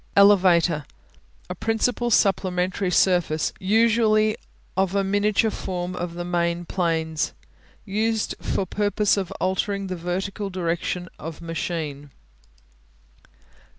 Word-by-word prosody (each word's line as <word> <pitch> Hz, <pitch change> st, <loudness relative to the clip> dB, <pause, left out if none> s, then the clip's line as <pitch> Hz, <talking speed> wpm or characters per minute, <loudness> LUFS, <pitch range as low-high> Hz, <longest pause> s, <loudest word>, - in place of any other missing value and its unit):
Elevator 180 Hz, -6 st, +5 dB, 0.6 s
A 180 Hz, -, -4 dB
principal 225 Hz, +5 st, 0 dB
supplementary 185 Hz, -2 st, +1 dB
surface, 175 Hz, -3 st, +2 dB
usually 215 Hz, +1 st, +3 dB, 0.4 s
of 190 Hz, 0 st, +1 dB
a 200 Hz, -, +2 dB
miniature 205 Hz, +3 st, +2 dB
form 180 Hz, -2 st, -4 dB
of 175 Hz, -1 st, -4 dB
the 175 Hz, 0 st, -4 dB
main 175 Hz, 0 st, -1 dB
planes. 160 Hz, -3 st, -1 dB, 0.5 s
Used 220 Hz, +2 st, 0 dB
for 195 Hz, -, -1 dB
purpose 205 Hz, +2 st, +1 dB
of 195 Hz, -3 st, -2 dB
altering 195 Hz, +1 st, -1 dB
the 185 Hz, -1 st, -4 dB
vertical 190 Hz, +4 st, -3 dB
direction 175 Hz, 0 st, -2 dB
of 160 Hz, 0 st, -7 dB
machine. 160 Hz, -3 st, -4 dB
185 Hz, 105 wpm, -24 LUFS, 170-205 Hz, 0.6 s, Elevator